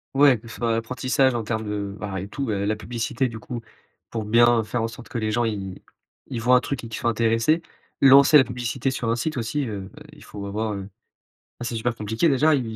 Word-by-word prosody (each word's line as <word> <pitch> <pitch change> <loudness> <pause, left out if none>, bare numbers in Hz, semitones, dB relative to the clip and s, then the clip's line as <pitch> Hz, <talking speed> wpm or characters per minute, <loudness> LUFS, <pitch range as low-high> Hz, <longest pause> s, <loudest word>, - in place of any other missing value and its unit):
Ouais, 135 -4 +6
que 115 - -14
ce 115 - -9
soit 115 -1 0
apprentissage, 130 +2 +1
en 115 - -1
termes 110 0 -3
de, 100 -1 -3
ben, 100 -2 -5
eh 95 +2 -4
tout 135 -1 -4
et 100 -1 -1
la 105 +1 0
publicité, 115 +3 -2
du 115 -2 -7
coup, 120 +2 -6 0.5
pour 115 -2 -3
bien, 115 +1 +4
faire 115 +2 -2
en 115 - 0
sorte 120 +1 -11
que - - -4
les 110 -1 -1
gens 120 +2 +1
ils 100 -4 -4 0.5
ils 120 - -4
voient 125 +2 +5
un 125 - +5
truc 135 -4 -4
et - - -6
qu'ils 110 - -6
soient 120 - +1
intéressés. 115 +8 +2 0.4
Lancer 140 +2 +8
la 130 - +5
publicité 125 +2 -2
sur 115 -3 -2
un 115 - +1
site 155 +5 -2
aussi, 120 +3 -2
heu, 100 -3 -6
bah, 150 +1 -13
il - - -15
faut 100 -1 -8
avoir, 110 +2 -2
heu. 100 -1 -5
Ben, 95 - -11 0.8
c'est 120 0 -3
super 115 +1 -1
compliqué, 110 +10 0
déjà, 150 +3 +4
et - - +3
et - - -2
115 Hz, 250 wpm, -24 LUFS, 110-130 Hz, 0.8 s, Lancer